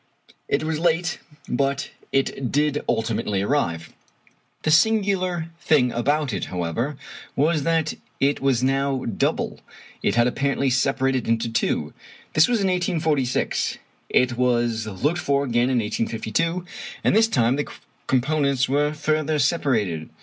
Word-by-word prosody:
It -, -, 0 dB
was 155 Hz, -1 st, -1 dB
late, 175 Hz, +1 st, +1 dB, 0.3 s
but 135 Hz, +1 st, -1 dB, 0.2 s
it 135 Hz, -2 st, 0 dB
did 150 Hz, 0 st, +1 dB
ultimately 110 Hz, -3 st, 0 dB
arrive. 85 Hz, -, -1 dB, 0.7 s
The 155 Hz, -, +2 dB
singular 185 Hz, -3 st, +2 dB
thing 145 Hz, -8 st, +3 dB
about 140 Hz, +2 st, 0 dB
it, 95 Hz, -, -2 dB
however, 90 Hz, -, -3 dB, 0.4 s
was 155 Hz, +2 st, +2 dB
that 165 Hz, +1 st, +1 dB, 0.3 s
it 140 Hz, +1 st, +1 dB
was 135 Hz, -3 st, +2 dB
now 135 Hz, 0 st, 0 dB
double. 115 Hz, -, -1 dB, 0.4 s
It -, -, +1 dB
had 120 Hz, 0 st, +4 dB
apparently 140 Hz, +1 st, 0 dB
separated 135 Hz, -1 st, +1 dB
into 115 Hz, 0 st, +1 dB
two. 75 Hz, -8 st, 0 dB, 0.4 s
This 155 Hz, +1 st, +5 dB
was 240 Hz, -3 st, +1 dB
in 195 Hz, -, +2 dB
1846. 160 Hz, -7 st, 0 dB, 0.3 s
It 125 Hz, -1 st, +2 dB
was 120 Hz, -3 st, +1 dB
looked 145 Hz, -, -1 dB
for 140 Hz, -3 st, +1 dB
again 120 Hz, -1 st, +1 dB
in 130 Hz, -, +1 dB
1852, 115 Hz, +10 st, -1 dB, 0.4 s
and -, -, +3 dB
this 220 Hz, +1 st, +5 dB
time 120 Hz, -, +2 dB
the 145 Hz, -, -2 dB, 0.4 s
components 140 Hz, 0 st, +1 dB
were 145 Hz, +2 st, +1 dB
further 155 Hz, 0 st, 0 dB
separated. 115 Hz, -, 0 dB
135 Hz, 135 wpm, -23 LUFS, 120-155 Hz, 0.7 s, This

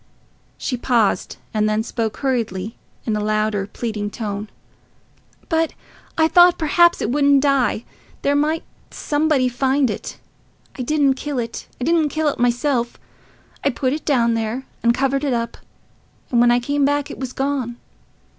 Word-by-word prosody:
She 250 Hz, -, -2 dB
paused, 230 Hz, -6 st, +1 dB, 0.2 s
and 215 Hz, -1 st, +2 dB
then 215 Hz, +1 st, +1 dB
spoke 225 Hz, -2 st, -3 dB
hurriedly 225 Hz, -6 st, -2 dB, 0.3 s
in 220 Hz, -, 0 dB
a -, -, -1 dB
louder, 215 Hz, -1 st, 0 dB
pleading 210 Hz, -2 st, -4 dB
tone. 205 Hz, -1 st, -5 dB, 1.0 s
"But 325 Hz, -1 st, +1 dB, 0.4 s
I 320 Hz, 0 st, +5 dB
thought 350 Hz, +1 st, +6 dB
perhaps 345 Hz, +2 st, +4 dB
it 220 Hz, -, -1 dB
wouldn't 280 Hz, 0 st, +4 dB
die—there 275 Hz, 0 st, -1 dB
might 305 Hz, +3 st, +1 dB, 0.3 s
somebody 295 Hz, -3 st, +1 dB
find 265 Hz, +1 st, +1 dB
it. 200 Hz, -, -6 dB, 0.6 s
I -, -, -5 dB
didn't 280 Hz, +1 st, +2 dB
kill 280 Hz, +1 st, -4 dB
it—I 235 Hz, +1 st, -5 dB
didn't 320 Hz, +1 st, +2 dB
kill 310 Hz, +1 st, +1 dB
it -, -, -5 dB
myself. 245 Hz, 0 st, +1 dB, 0.7 s
I 280 Hz, -, +3 dB
put 260 Hz, 0 st, -1 dB
it 305 Hz, -, -4 dB
down 235 Hz, -5 st, +2 dB
there 225 Hz, +3 st, -2 dB, 0.2 s
and 235 Hz, -, +4 dB
covered 270 Hz, +3 st, 0 dB
it 280 Hz, -3 st, +1 dB
up, 235 Hz, -1 st, -2 dB, 0.8 s
and 240 Hz, -2 st, +4 dB
when 240 Hz, -, +5 dB
I 240 Hz, 0 st, +4 dB
came 285 Hz, +3 st, 0 dB
back 285 Hz, 0 st, +1 dB
it -, -, -9 dB
was 260 Hz, -2 st, -4 dB
gone.... 265 Hz, -3 st, -2 dB
255 Hz, 155 wpm, -21 LUFS, 230-290 Hz, 1.0 s, thought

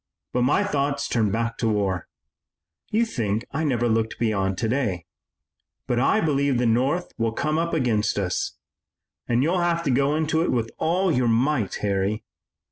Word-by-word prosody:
But 125 Hz, -, +1 dB
my 125 Hz, +4 st, +3 dB
thoughts 140 Hz, 0 st, -1 dB
turn 110 Hz, -3 st, +1 dB
back 115 Hz, +2 st, -2 dB
to 115 Hz, -, +1 dB
war. 100 Hz, -4 st, -1 dB, 0.8 s
You 225 Hz, +2 st, +2 dB
think 115 Hz, -, -2 dB
I 155 Hz, +3 st, -2 dB
never 120 Hz, -5 st, +1 dB
look 110 Hz, -1 st, 0 dB
beyond 100 Hz, -5 st, 0 dB
today, 110 Hz, -, -1 dB, 0.8 s
but 120 Hz, -2 st, 0 dB
I 215 Hz, -, +3 dB
believe 140 Hz, -4 st, +1 dB
the 125 Hz, -, +1 dB
North 130 Hz, +10 st, +1 dB
will 115 Hz, -1 st, 0 dB
come 155 Hz, +6 st, 0 dB
up 170 Hz, 0 st, -1 dB
against 115 Hz, -9 st, +1 dB
us. 95 Hz, -3 st, -2 dB, 0.7 s
And 120 Hz, +2 st, +2 dB
you'll 175 Hz, +4 st, +1 dB
have 170 Hz, -1 st, +1 dB
to 140 Hz, -, +1 dB
go 140 Hz, +3 st, +2 dB
into 160 Hz, +1 st, +1 dB
it 170 Hz, -, +1 dB
with 115 Hz, -2 st, -1 dB
all 180 Hz, +3 st, +1 dB
your 125 Hz, -4 st, +2 dB
might, 120 Hz, -1 st, +1 dB
Harry. 100 Hz, +2 st, 0 dB
125 Hz, 170 wpm, -24 LUFS, 110-150 Hz, 0.8 s, my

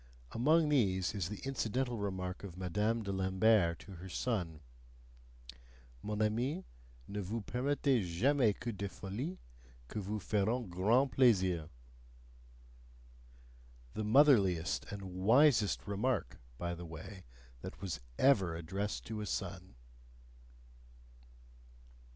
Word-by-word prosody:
Among 155 Hz, +6 st, +3 dB
these 95 Hz, -11 st, +2 dB
is 95 Hz, -5 st, -2 dB
the 105 Hz, -, -6 dB
incidental 130 Hz, -1 st, -1 dB
remark 95 Hz, -2 st, -4 dB
of 90 Hz, -3 st, -8 dB
Madame 105 Hz, +5 st, 0 dB
de 100 Hz, -, -3 dB
Lambert 95 Hz, -1 st, +3 dB
to 100 Hz, -, -12 dB
her 95 Hz, +3 st, -9 dB
son: 85 Hz, -8 st, -2 dB, 1.4 s
"MON 105 Hz, +1 st, -1 dB
AMI, 125 Hz, -, 0 dB, 0.4 s
NE 105 Hz, -, -4 dB
VOUS 105 Hz, +3 st, -3 dB
PERMETTEZ 125 Hz, -, 0 dB
JAMAIS 125 Hz, 0 st, +3 dB
QUE 120 Hz, -, -3 dB
DES 100 Hz, -1 st, -4 dB
FOLIES, 100 Hz, -, -5 dB, 0.5 s
QUI 105 Hz, -, -4 dB
VOUS 105 Hz, 0 st, -4 dB
FERONT 110 Hz, +2 st, 0 dB
GRAND 115 Hz, +9 st, +3 dB
PLAISIR" 95 Hz, -, +3 dB, 2.2 s
the 110 Hz, -, -3 dB
motherliest 105 Hz, -, +4 dB
and 100 Hz, -1 st, -6 dB, 0.2 s
wisest 115 Hz, -1 st, +4 dB
remark, 100 Hz, -, -1 dB, 0.2 s
by 85 Hz, +3 st, -3 dB
the 85 Hz, 0 st, -7 dB
way, 85 Hz, +4 st, -9 dB, 0.4 s
that -, -, -8 dB
was 95 Hz, -7 st, -4 dB, 0.2 s
ever 95 Hz, -12 st, +4 dB
addressed 95 Hz, +6 st, -4 dB
to 110 Hz, -1 st, -4 dB
a 105 Hz, -, -4 dB
son. -, -, -4 dB
105 Hz, 115 wpm, -34 LUFS, 95-120 Hz, 2.2 s, motherliest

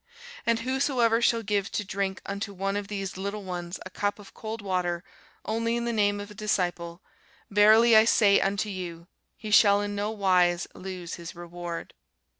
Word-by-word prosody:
And 230 Hz, -1 st, +2 dB
whosoever 255 Hz, -3 st, +1 dB
shall 230 Hz, -1 st, +2 dB
give 200 Hz, 0 st, -1 dB
to 210 Hz, -, -1 dB
drink 195 Hz, 0 st, -3 dB
unto 200 Hz, +1 st, -4 dB
one 195 Hz, +1 st, -2 dB
of 205 Hz, -1 st, -3 dB
these 195 Hz, -3 st, -5 dB
little 200 Hz, +2 st, -4 dB
ones 180 Hz, -1 st, -5 dB
a 185 Hz, -, -8 dB
cup 205 Hz, +2 st, -1 dB
of 205 Hz, -2 st, -14 dB
cold 220 Hz, +1 st, -6 dB
water 180 Hz, -3 st, -2 dB, 0.4 s
only 230 Hz, +1 st, 0 dB
in 235 Hz, 0 st, -2 dB
the 235 Hz, -, -1 dB
name 205 Hz, -2 st, +2 dB
of 205 Hz, +1 st, -8 dB
a -, -, -9 dB
disciple, 180 Hz, -5 st, -2 dB, 0.5 s
verily 220 Hz, +3 st, +6 dB
I 220 Hz, 0 st, +8 dB
say 205 Hz, -3 st, +5 dB
unto 200 Hz, +2 st, 0 dB
you, 175 Hz, -3 st, -6 dB, 0.3 s
he 215 Hz, -2 st, -7 dB
shall 205 Hz, -1 st, +6 dB
in 205 Hz, 0 st, -3 dB
no 205 Hz, +1 st, -2 dB
wise 185 Hz, -4 st, +2 dB
lose 185 Hz, -2 st, -7 dB
his 170 Hz, -1 st, -8 dB
reward. 175 Hz, 0 st, -7 dB
200 Hz, 180 wpm, -27 LUFS, 185-215 Hz, 0.5 s, I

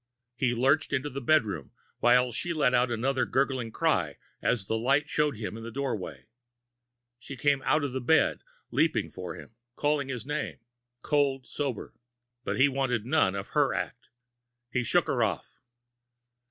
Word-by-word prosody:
He 125 Hz, -2 st, +1 dB
lurched 140 Hz, +6 st, +2 dB
into 140 Hz, +1 st, -1 dB
the 140 Hz, +2 st, -5 dB
bedroom, 110 Hz, -, +1 dB, 0.3 s
while 125 Hz, +1 st, +4 dB
she 170 Hz, +9 st, -2 dB
let 140 Hz, -5 st, +2 dB
out 125 Hz, 0 st, +3 dB
another 130 Hz, +3 st, 0 dB
gurgling 130 Hz, -4 st, 0 dB
cry -, -, 0 dB, 0.2 s
as 110 Hz, -6 st, +1 dB
the 110 Hz, -, -1 dB
light 135 Hz, +6 st, +2 dB
showed 150 Hz, -5 st, 0 dB
him 105 Hz, -2 st, -5 dB
in 115 Hz, -, -7 dB
the 115 Hz, -, -6 dB
doorway. 125 Hz, -6 st, -4 dB, 0.9 s
She 130 Hz, +2 st, -8 dB
came 140 Hz, +1 st, +2 dB
out 150 Hz, +2 st, +3 dB
of 140 Hz, -, -1 dB
the 130 Hz, -, -2 dB
bed, 160 Hz, +7 st, +3 dB, 0.3 s
leaping 160 Hz, 0 st, +1 dB
for 90 Hz, -1 st, -6 dB
him, -, -, -12 dB, 0.2 s
crying 145 Hz, -2 st, 0 dB
his 125 Hz, -3 st, -4 dB
name 150 Hz, -, -3 dB, 0.5 s
cold 140 Hz, -3 st, +1 dB
sober! 135 Hz, -7 st, -4 dB, 0.5 s
But -, -, -2 dB
he 135 Hz, -, +7 dB
wanted 130 Hz, -5 st, -1 dB
none 125 Hz, -8 st, +2 dB
of 100 Hz, 0 st, -5 dB
her 145 Hz, -5 st, +2 dB
act. 125 Hz, -, -5 dB, 0.6 s
He 125 Hz, -, 0 dB
shook -, -, +3 dB
her -, -, 0 dB
off. -, -, -2 dB
130 Hz, 165 wpm, -28 LUFS, 120-145 Hz, 0.9 s, he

